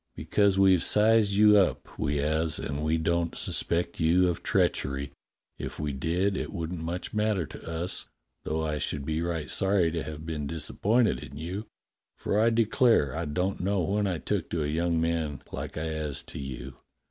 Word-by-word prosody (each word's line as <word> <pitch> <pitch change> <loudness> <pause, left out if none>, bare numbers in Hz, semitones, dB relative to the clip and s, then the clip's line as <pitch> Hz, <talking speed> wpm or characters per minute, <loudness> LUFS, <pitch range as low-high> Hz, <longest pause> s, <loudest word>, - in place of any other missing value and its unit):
"Because 100 -2 +2
we've 95 -3 +5
sized 105 0 +4
you 105 +1 +6
up, 95 -3 +2
w^e 75 +1 -3
'as, 80 +2 +1
and 70 +1 -4
we 80 +1 +2
don't 85 +1 0
suspect 85 0 -1
you 90 +3 +4
of 85 - -3
treachery. 70 0 0 0.5
If - - -6
we 75 -1 -2
did, 90 +8 0
it - - -3
wouldn't 85 0 -4
much 85 +3 -4
matter 105 -5 +1
to - - -10
us, 85 +2 -3 0.4
though 80 +1 -1
I 75 -1 -2
should 70 -1 -3
be 80 +1 -1
right 85 -3 -2
sorry 95 -3 +2
to 85 0 -2
have 75 +1 -7
been 75 -3 -3
disappointed 100 - +1
in 70 0 -9
you, 95 +8 -5 0.5
for 105 - 0
I 115 +1 +5
declare 115 - +3
I 85 +1 -2
don't 90 +6 -1
know 95 +1 0
when 100 +4 0
I 90 -3 -1
took - - -2
to 80 -3 -1
a - - -1
young 85 +2 0
man 80 -3 -1
like - - -6
I 80 - -2
'as 75 -3 -3
to - - -9
you. 65 -2 -7
85 Hz, 185 wpm, -28 LUFS, 75-95 Hz, 0.5 s, you